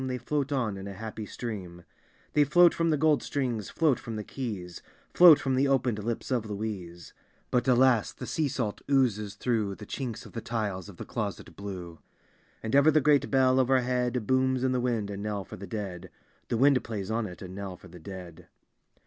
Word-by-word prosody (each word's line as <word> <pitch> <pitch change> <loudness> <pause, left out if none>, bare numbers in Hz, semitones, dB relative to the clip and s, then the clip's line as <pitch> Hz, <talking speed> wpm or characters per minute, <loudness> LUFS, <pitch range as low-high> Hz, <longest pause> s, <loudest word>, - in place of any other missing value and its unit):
They 130 -1 -2
float 145 +3 -2
on 115 -8 -1
in 95 +1 -7
a 100 - -7
happy 110 +1 -6
stream; 95 -8 -6 0.5
They 150 - +5
float 175 +5 +6
from 165 0 +1
the 155 - +2
gold 155 0 +3
strings, 125 -7 -2
float, 155 -6 +2
from 115 - -6
the 105 - -4
keys, 100 -9 -6 0.3
Float 175 -4 +9
from 135 -2 -1
the 135 +2 +3
open'd 125 -6 +1
lips 115 +4 -3
of 115 -4 0
Louise: 100 -5 -6 0.4
But, 125 -1 +2
alasl 125 -3 +3
the - - -7
sea 155 -2 0
salt 120 -6 -3
oozes 105 -7 +2
through 110 -4 -1
The - - -10
chinb 125 -5 -4
of - - -12
the 115 - -4
tiles 105 -5 -3
of 95 - -12
the - - -7
Closet 105 -6 -5
Blue; 90 -5 -7 0.6
And 110 +3 -1
ever 140 +2 +6
the 155 0 +5
great 145 -1 +3
bell 130 -1 +4
overhead 125 -2 +1
Booms 130 +1 +2
in 130 - +2
the 125 -1 0
wind 115 -5 -1
a 100 - -5
inell 100 -1 -3
for - - -9
the 100 +2 -8
dead. 95 -3 -5 0.4
The 115 - -1
wind 135 -1 +4
plays 105 -3 -4
on 115 -1 0
it 90 -1 -10
a - - -6
inell 95 0 -7
for 90 - -15
the 90 0 -13
dead. 90 -2 -10
115 Hz, 205 wpm, -28 LUFS, 100-130 Hz, 0.6 s, Float